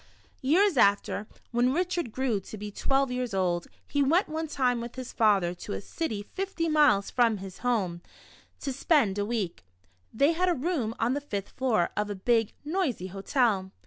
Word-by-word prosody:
Years 340 +5 +3
after, 205 0 +3 0.2
when 245 +2 +2
Richard 350 -5 -1
orew 255 -6 +1
to 215 - -8
be 210 0 -6
twelve 270 +4 +1
years 250 -4 -2
old, 175 -2 0 0.2
he 285 - 0
went 320 +8 +3
one 320 +1 -3
time 250 -5 +1
with 235 0 -7
his 255 -1 -7
father 200 -6 +3
to 180 +3 -7
a - - -3
city 215 - -4
fifty 380 - -3
miles 295 -11 +4
from 235 -3 +3
his 190 -1 -9
home, 195 -9 0 0.6
to 275 - -2
spend 255 - +2
a 205 - 0
week. 210 - -3 0.5
They 280 +7 +3
had 360 +2 +1
a 350 - +2
room 260 -6 -1
on 235 +3 +1
the 290 - -2
fifth 205 -8 -4
floor 230 -9 +1
of 210 0 -1
a 205 - -3
big, 225 +2 +1
noisy 295 - -1
hotel. 200 -2 +1
240 Hz, 180 wpm, -28 LUFS, 205-290 Hz, 0.6 s, miles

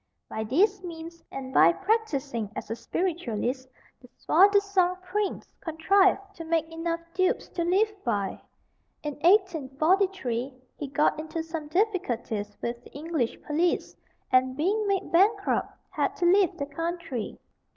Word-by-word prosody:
By 220 - -4
these 380 - +2
means, 335 -1 -8
and 265 -1 -6
by - - +7
practising 295 - -1
as - - -6
a - - -1
spiritualist, 260 - -2 0.3
the 250 - -15
soi 370 +5 +5
disant 395 -3 +2
prince 395 +2 -3
contrived 380 +5 +3 0.2
to 330 - -6
make 325 -1 0
enough 335 +1 -2
dupes 370 0 +1
to 340 - -2
live 400 +5 +2
by. 205 -6 -1 0.6
In 295 -1 -3
1843 320 - +2 0.2
he 290 - -5
got 295 +2 +1
into 320 +1 -4
some 320 -2 -5
difficulties 255 - -1
with 235 0 -3
the - - -15
English 300 -5 -2
police, 330 +3 0 0.4
and 255 0 +3
being 405 +7 +1
made 395 -1 -1
bankrupt, 400 +4 +3 0.2
had - - -1
to 350 - -1
leave 375 0 +4
the 280 - -2
country. 330 -4 -4
330 Hz, 140 wpm, -27 LUFS, 265-375 Hz, 0.6 s, by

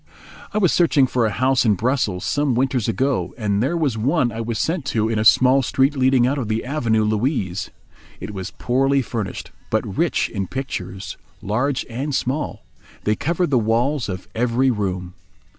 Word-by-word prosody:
I - - -2
was 185 -6 +3
searching 150 -6 +4
for 125 -3 +1
a - - 0
house 130 +4 +2
in 110 -4 +3
Brussels 110 -4 -1
some 145 -3 +1
winters 130 -2 0
ago, 130 +3 -1
and 105 -3 0
there 145 +8 0
was 140 -9 0
one 130 +1 +1
I 115 +1 -4
was 115 0 -3
sent 165 +4 -1
to 110 -3 0
in 110 -1 0
a - - +1
small 130 +4 +5
street 135 +3 +1
leading 130 -2 +3
out 140 +3 0
of 120 - -3
the 110 +1 -2
Avenue 120 -6 +1
Louise. 105 - -1 0.5
It 100 +3 -7
was 95 0 -5
poorly 135 +2 +1
furnished, 110 -5 -5 0.2
but - - 0
rich - - +1
in 95 -1 -4
pictures, 95 -8 -5 0.2
large 125 +6 -1
and 135 +4 -3
small. 135 +5 -2 0.4
They 105 - +1
covered 170 - -1
the 130 - +4
walls 120 +4 0
of 95 -1 -5
every 125 +3 +2
room. 95 -5 -3
125 Hz, 180 wpm, -21 LUFS, 110-135 Hz, 0.5 s, small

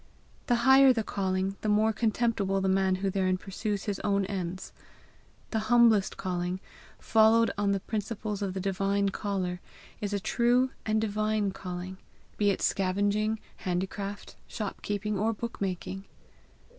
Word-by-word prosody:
The 245 - +3
higher 265 0 +8
the 230 -3 0
calling 190 -1 -1
the 215 - -1
more 215 +1 +3
contemptible 215 -3 0
the 190 - 0
man 190 0 +2
who 195 - +1
therein 185 -1 +1
pursues 200 +2 -3
his 205 -2 -3
own 200 -1 +1
ends. 185 -1 -5 0.8
The 220 - +1
humblest 230 -5 +4
calling, 180 0 -2 0.4
followed 225 +1 +4
on 205 -1 +1
the 195 -1 0
principles 210 -1 -4
of 195 -2 -2
the - - -2
divine 195 +1 0
caller, 190 -3 -3 0.4
is 205 -1 -3
a 205 - 0
true 245 +5 +2 0.2
and 215 0 +2
divine 215 -1 0
calling, 185 0 -6 0.4
be 205 -1 +3
it 195 - -1
scavenging, 205 +3 +1 0.2
handicraft, 195 +2 -4
shop 210 -3 -5
keeping, 205 0 -2
or 225 +2 +1
book 230 +1 -6
making. 195 0 -3
200 Hz, 145 wpm, -29 LUFS, 190-215 Hz, 0.8 s, higher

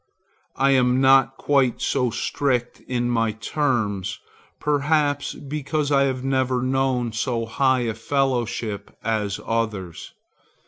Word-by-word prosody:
I 135 +1 +3
am 125 -1 +3
not 135 0 +4
quite 135 -4 +2
so 125 -3 +1
strict 120 +1 -1
in 120 -1 -1
my 115 -2 +1
terms, 105 -6 -1 0.4
perhaps 145 0 +1
because 145 +1 -3
I 140 -1 +4
have 130 -2 -2
never 130 -2 0
known 130 -2 0
so 115 +1 -1
high 130 +3 +2
a 115 -2 -1
fellowship 120 -3 -2
as 105 -3 -1
others. 105 -7 -3
130 Hz, 120 wpm, -23 LUFS, 115-135 Hz, 0.4 s, not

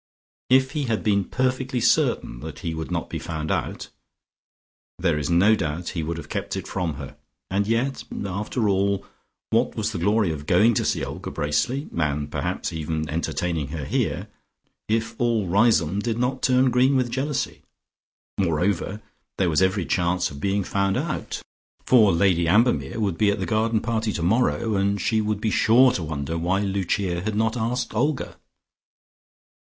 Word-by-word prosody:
If 130 +1 +4
he 150 -2 -2
had 115 -3 -1
been 100 -2 +2
perfectly 130 +1 -1
certain - - +1
that - - -8
he 85 - -3
would 80 0 -5
not 85 -2 -2
be - - -5
found 80 -2 -4
out, - - -3 1.1
there 85 -4 +1
is 75 - -3
no 90 +6 +5
doubt 80 -2 -3
he 85 - -3
would 80 +1 -3
have 80 -3 -8
kept - - -3
it - - -5
from 90 -5 -2
her, 70 -1 -9 0.3
and 100 +1 +1
yet, 125 +4 0 0.2
after 105 +4 -2
all, 100 0 +1 0.5
what - - +2
was 110 0 -1
the 95 - -4
glory 105 0 +2
of 75 -1 -6
going 105 +7 +5
to - - 0
see - - 0
Olga - - -6
Bracely 75 - -1
(and 75 -2 -1
perhaps - - -2
even 80 -1 -3
entertaining 80 -1 -2
her 75 0 -5
here) - - -1 0.6
if 115 +1 0
all 115 -4 +2
Riseholme 100 -2 +3
did 115 +1 -1
not 125 +2 -1
turn 130 0 +3
green 130 +3 +3
with 125 -2 +1
jealousy? 135 +3 -2 0.8
Moreover 95 +3 0 0.3
there 90 -3 +2
was 80 - +2
every 95 -1 +2
chance 90 -1 0
of 70 0 -9
being 100 0 +1
found 100 +1 0
out, - - -3 0.4
for 110 -6 +6
Lady 85 -1 +2
Ambermere 115 +4 +2
would 100 -6 -1
be 105 - +4
at 100 - +1
the 95 - -2
garden 110 +1 +1
party 110 -1 -1
tomorrow, 110 +4 +1
and 100 +1 +1
she 110 +1 +1
would 105 -1 -1
be 110 0 -1
sure 125 +6 +5
to 100 - -2
wonder 80 +1 -3
why 90 +4 +1
Lucia 95 -2 -1
had 105 +2 -2
not 110 +1 +1
asked 120 +1 -2
Olga. 135 +6 -1
100 Hz, 170 wpm, -24 LUFS, 85-115 Hz, 1.1 s, for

